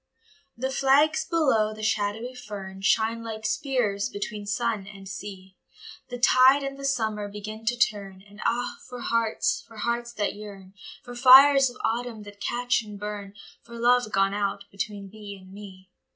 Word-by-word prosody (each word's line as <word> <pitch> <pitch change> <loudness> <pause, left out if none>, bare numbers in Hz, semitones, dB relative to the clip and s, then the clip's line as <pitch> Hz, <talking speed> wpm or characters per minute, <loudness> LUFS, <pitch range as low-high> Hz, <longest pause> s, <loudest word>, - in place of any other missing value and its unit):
THE 260 +2 -2
flags 285 +4 +3
below 245 -11 +2
the 215 - -8
shadowy 215 +3 -1
fern 200 -6 -8
Shine 225 +3 +2
like 220 -1 -6
spears 220 -5 0
between 205 0 -5
sun 220 -2 -1
and 195 -1 -11
sea, 190 -1 -9 0.5
The 245 - -5
tide 260 +3 +5
and 275 0 -4
the 275 0 -7
summer 220 -6 -1
begin 215 +2 -8
to 245 +1 +1
turn, 200 -5 -1
And 205 +1 -13
ah, 245 +1 -1
for 250 -1 -7
hearts, 230 -1 0
for 225 - -15
hearts 235 +2 -2
that 210 -3 -1
yearn, 200 -2 -11 0.3
For 245 - -9
fires 270 +2 +8
of 245 - -12
autumn 230 -1 -2
that 205 0 -13
catch 245 +2 0
and 210 -2 -10
burn, 205 -1 -6 0.3
For 235 0 -11
love 240 -1 +3
gone 195 0 +2
out 200 -1 -2
between 200 0 -5
thee 205 -2 -9
and 185 0 -15
me. 190 -2 -12
215 Hz, 165 wpm, -26 LUFS, 200-245 Hz, 0.5 s, fires